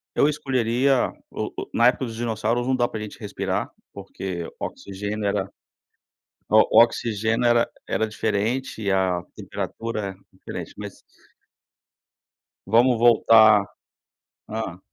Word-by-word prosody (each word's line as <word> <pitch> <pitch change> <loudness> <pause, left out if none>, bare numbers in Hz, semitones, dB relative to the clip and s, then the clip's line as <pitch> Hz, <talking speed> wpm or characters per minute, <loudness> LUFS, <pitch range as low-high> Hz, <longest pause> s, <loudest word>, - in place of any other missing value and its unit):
eu 145 - +4
escolheria 135 -3 +1 0.2
o - - -4
o - - -6
na 120 +1 +5
época 130 +1 +1
dos 115 -1 -7
dinossauros, 115 +1 -1
não 130 - +2
dá 120 -1 +1
pra 110 - -6
a - - -5
gente 105 - -9
respirar, - - -3 0.2
porque 95 -3 -6
oxigênio 100 +2 -5
era 100 -1 -1 1.0
o 110 +1 +6
oxigênio 115 0 +1
era 120 0 +3 0.2
era 110 - 0
diferente 110 +3 -2
e 100 - 0
a 95 -2 +1
temperatura 105 -4 -5 0.2
diferente, 95 - -8
mas - - -9 1.7
vamos 120 +4 +4
voltar 110 -2 +6 0.8
hã. 110 -5 -5
110 Hz, 120 wpm, -23 LUFS, 100-120 Hz, 1.7 s, o